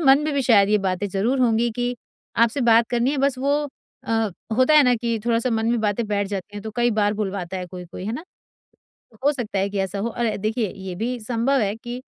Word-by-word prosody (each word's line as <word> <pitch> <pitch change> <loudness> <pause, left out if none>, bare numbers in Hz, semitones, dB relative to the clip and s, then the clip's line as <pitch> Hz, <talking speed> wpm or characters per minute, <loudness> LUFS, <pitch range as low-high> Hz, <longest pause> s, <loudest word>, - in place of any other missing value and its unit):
मन 270 -3 +6
में 305 - -1
भी 275 - +1
शायद 205 -6 +5
ये 210 - +4
बातें 190 0 -1
ज़रूर 215 +8 0
होंगी 235 -1 +2
कि 245 0 -1 0.4
आपसे 230 +4 +3
बात 230 -1 +4
करनी 240 +2 +1
है। 295 - -1
बस 275 -1 +1
वो 275 +2 +1 0.5
अ, 225 -2 +1 0.3
होता 260 +5 +4
है 300 - +8
ना 250 - +4
कि 230 -1 -1
थोड़ा-सा 235 +1 +1
मन 225 -1 0
में 235 - +1
बातें 215 +1 0
बैठ 205 -1 0
जाती 200 0 -5
हैं, 205 - -6
तो 220 - -5
कई 240 0 +3
बार 205 0 +2
भुलवाता 195 -3 -3
है 180 -1 -5
कोई-कोई 180 0 -9
है 220 - -2
ना। 315 +8 -5 1.0
हो 290 - +5
सकता 230 -7 -3
है 195 +1 0
कि 200 - -3
ऐसा 195 +1 -2
हो 230 - -1
और 235 -2 -1
देखिए 215 0 -1
ये 190 -1 -6
भी 245 +4 -2
सँभव 240 +4 +1
है 205 0 0
कि 240 +2 -7
225 Hz, 235 wpm, -23 LUFS, 205-245 Hz, 1.0 s, है